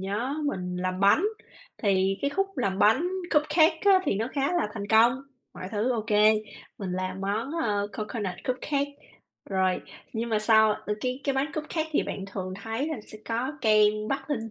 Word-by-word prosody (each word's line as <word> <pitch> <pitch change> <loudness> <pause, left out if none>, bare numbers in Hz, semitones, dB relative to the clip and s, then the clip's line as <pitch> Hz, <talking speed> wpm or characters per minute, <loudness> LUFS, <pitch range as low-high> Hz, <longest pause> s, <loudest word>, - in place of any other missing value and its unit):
nhớ 210 +8 -2
mình 180 -8 -3
làm 185 +1 -2
bánh, 200 - +5 0.6
thì 195 -1 +2
cái 280 - +1
khúc 390 +6 0
làm 195 -6 0
bánh 260 +13 +4 0.3
cupcake 315 +2 +4
á, 390 -2 +6
thì - - +1
nó 225 +4 -1
khá 280 +3 0
là 350 -11 +1
thành 200 -2 -4
công, 235 +4 +5 0.3
mọi 185 - -7
thứ 220 +4 +1
OK. 220 -3 -3 0.7
Mình 190 -3 -4
làm 185 +1 -3
món, 210 +7 -2
à, 205 -2 +1
coconut 210 -3 -4
cupcake 280 +3 -1 0.6
rồi, 190 -1 +1 0.3
nhưng 230 +1 -2
mà 220 -2 +1
sau 220 0 +5
ơ, 210 0 -3
cái 255 +2 -2
cái 275 - +1
bánh 275 +3 -1
cupcake 310 +1 -3
thì - - +2
bạn 195 - -5
thường 190 -2 -5
thấy 225 +7 -2
là 315 - -3
sẽ 215 - -11
có 240 +5 -2
kem 215 -2 +3
bắt 275 +1 -3
lên 225 -6 -2
225 Hz, 185 wpm, -27 LUFS, 200-275 Hz, 0.7 s, á